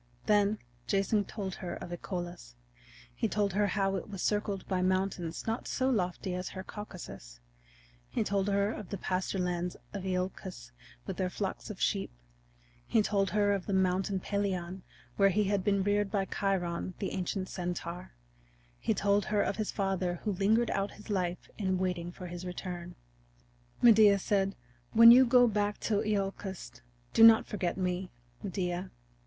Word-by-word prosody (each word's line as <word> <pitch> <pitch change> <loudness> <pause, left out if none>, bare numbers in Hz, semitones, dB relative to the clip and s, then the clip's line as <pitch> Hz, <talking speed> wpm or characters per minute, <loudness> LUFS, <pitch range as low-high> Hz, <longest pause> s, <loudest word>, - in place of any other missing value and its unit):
Then 210 0 +3 0.3
Jason 200 - +2
told 195 -3 -5
her 175 -2 -5
of 175 - -8
Icolus; 175 - -6 0.6
he - - -1
told 205 -2 0
her 205 +1 +2
how 195 0 0
it 190 - -7
was 195 -3 -5
circled 205 -2 -1
by 185 -2 0
mountains 185 -2 -1
not 225 +1 -2
so 260 +1 +1
lofty 185 -4 -1
as 180 0 -3
her 185 - -7
Caucasus; 180 - -9 0.7
he - - 0
told 200 -1 0
her 200 +1 +2
of 210 - -8
the 200 - -3
pasture 185 +1 -2
lands 180 -1 -2 0.2
of 200 -2 -4
Iolcus 185 - -4 0.3
with - - -5
their - - 0
flocks - - -4
of - - -7
sheep; - - 0 0.8
he 220 - +3
told 200 -2 +1
her 205 0 +2
of 195 -3 -3
the 200 - -1
Mountain 190 +1 +1
Pelion 190 -3 -2 0.4
where 195 0 +6
he 210 +3 +2
had 200 -1 0
been 200 -1 +2
reared 205 0 +1
by 195 -2 0
Chiron, 185 -3 -1
the 195 - -3
ancient 190 0 -2
centaur; 175 -1 -5 0.7
he - - 0
told 200 0 +2
her 210 -1 +1
of 200 - -2
his 215 -2 -1
father 190 -3 -1
who 215 - 0
lingered 215 +5 +2
out 195 +1 -1
his 210 +1 -10
life 180 -3 -1
in 190 -2 +1
waiting 180 -2 -2
for 180 - -9
his 175 0 -6
return. 180 -1 -6 0.9
Medea 215 -4 +7
said: 195 0 0 0.4
"When 230 +1 +10
you 255 +1 +8
go 245 0 +6
back 205 -1 0
to 210 -2 +1
Iolcus 195 - -3 0.3
do 225 - +6
not 225 -1 +9
forget 185 -4 -2
me, 180 0 -1 0.3
Medea. 180 -1 -3
195 Hz, 165 wpm, -31 LUFS, 180-205 Hz, 0.9 s, When